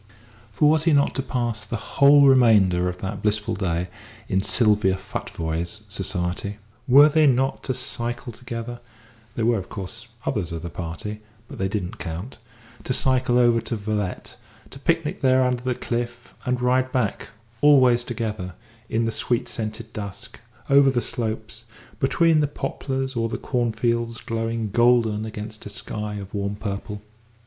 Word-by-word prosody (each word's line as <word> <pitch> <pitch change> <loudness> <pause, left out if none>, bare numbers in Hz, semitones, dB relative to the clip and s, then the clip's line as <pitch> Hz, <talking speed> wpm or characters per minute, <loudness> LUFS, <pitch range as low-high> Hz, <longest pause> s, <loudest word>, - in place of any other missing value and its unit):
For 125 +9 +3
was 155 +1 +3
he 165 - +4
not 140 0 +3
to - - -1
pass 120 -5 -2
the - - -4
whole 140 +5 +5
remainder 105 -9 +5
of 90 - -6
that 100 +1 -4
blissful 105 0 0
day 90 -2 -1 0.4
in 95 0 +1
Sylvia 105 -3 +3
Futvoye's 85 +2 -4
society? 95 +1 -2 0.3
Were 140 +3 +8
they 155 0 +4
not 135 0 +2
to 130 - -1
cycle 120 -1 -3
together 120 0 -6 0.6
(there 115 - 0
were, 115 -2 +3
of 90 - -9
course, 105 +3 -7 0.2
others 100 -9 -1
of 85 0 -5
the 85 - -5
party 90 +6 -6 0.3
but - - -10
they 95 - +1
did 100 0 -2
not 90 - -8
count), 90 +9 -6 0.5
to 130 - 0
cycle 130 -1 +2
over 120 -2 +4
to 115 +1 -4
Veulettes, 105 -2 -3 0.3
to 135 - -11
picnic 165 +1 0
there 130 -1 +4
under 125 -1 0
the 125 0 -1
cliff, 120 0 -4
and 125 0 0
ride 130 +1 +2
back 125 -6 -1 0.3
always 130 -5 +6
together 105 -7 -4 0.3
in 115 +1 +1
the 115 - 0
sweet 120 +2 -1
scented 110 0 -5
dusk, 100 -3 -7 0.3
over 140 0 +6
the 130 -2 +1
slopes, 115 -1 -4 0.3
between 160 +3 +3
the 150 - +2
poplars 135 -2 -3
or 115 -1 0
the - - -3
cornfields 115 -1 -1
glowing 115 -1 -2
golden 115 -2 +3
against 110 0 -7
a - - -7
sky 105 +1 -5
of 100 -1 -8
warm 100 0 -2
purple? 105 0 -5
115 Hz, 160 wpm, -24 LUFS, 105-125 Hz, 0.6 s, Were